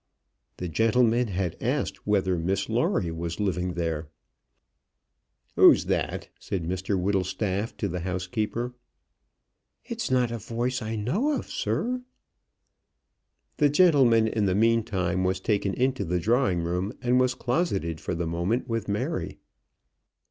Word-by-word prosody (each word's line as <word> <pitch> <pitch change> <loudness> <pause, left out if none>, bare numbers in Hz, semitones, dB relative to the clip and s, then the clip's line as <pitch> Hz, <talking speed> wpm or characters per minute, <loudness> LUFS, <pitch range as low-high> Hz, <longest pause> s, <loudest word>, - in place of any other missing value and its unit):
The 90 - -4
gentleman 115 +6 +3
had 95 -3 -3
asked - - -2
whether 95 -3 +2
Miss 95 +3 -1
Lawrie 115 - +1
was 85 +2 -4
living 90 -3 -1
there. 80 -2 -2 1.5
"Who's - - +7
that?" - - -1
said 95 -4 -3
Mr 95 +3 -1
Whittlestaff 100 +3 -1
to 100 - -1
the 90 -1 -3
housekeeper. 105 +7 -2 1.1
"It's - - -4
not 125 -2 +2
a 115 - -3
voice 120 +4 -2
as 110 - -5
I 110 - -2
know, 200 - 0
sir." 250 +1 -2 1.6
The 145 -2 +4
gentleman 135 -9 +5
in 110 -1 0
the 95 - +1
meantime 105 -5 +1
was 95 0 0
taken 100 -1 0
into 130 -2 +1
the 90 0 -1
drawing 100 -3 +2
room, 90 +5 -2
and 125 +1 +3
was 130 0 +2
closeted 100 - -1
for - - -3
the 85 +1 -2
moment 85 +10 -1
with 115 -3 -2
Mary. 100 0 -2
105 Hz, 135 wpm, -26 LUFS, 90-120 Hz, 1.6 s, Who's